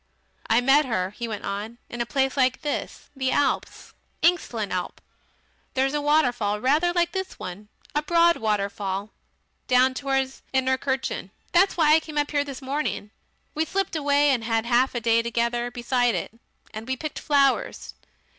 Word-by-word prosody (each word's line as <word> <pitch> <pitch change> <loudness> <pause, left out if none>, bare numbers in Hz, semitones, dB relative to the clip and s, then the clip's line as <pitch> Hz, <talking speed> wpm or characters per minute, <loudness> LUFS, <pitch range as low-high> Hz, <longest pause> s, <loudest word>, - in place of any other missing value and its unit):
"I 225 +2 +4
met 275 +4 +5
her," 190 -7 -1
he 235 +3 -5
went 215 -2 -5
on, 205 +4 -4
"in 240 - -5
a 235 - -2
place 270 -1 0
like 260 -2 +1
this 295 - -4
in - - -17
the 260 0 +1
Alps 285 - -1 0.3
Engstlen 245 - +1
Alp. 180 -1 -3 0.8
There's 270 +1 +1
a 295 - 0
waterfall 245 -9 +2
rather 300 +9 +2
like 345 -1 +1
this 380 -1 -4
one 200 +4 -8 0.2
a 295 - +1
broad 335 +2 +4
waterfall 200 -1 -2 0.6
down 255 +1 +4
towards 270 0 -1
Innertkirchen. 260 -5 0 0.2
That's 370 +2 +3
why 305 -2 +5
I 320 - +6
came 310 -1 -8
here 290 -1 +2
this 275 -1 -8
morning. 270 -6 -3 0.4
We 315 - 0
slipped 385 +1 -2
away 285 -1 +3
and 245 -4 0
had 225 0 0
half 245 +2 +2
a - - +1
day 230 0 +3
together 235 +1 -1
beside 245 0 +1
it. - - -3 0.4
And 220 +2 -7
we 260 0 -1
picked 310 +1 -5
flowers. 280 -3 +1
260 Hz, 165 wpm, -25 LUFS, 230-295 Hz, 0.8 s, I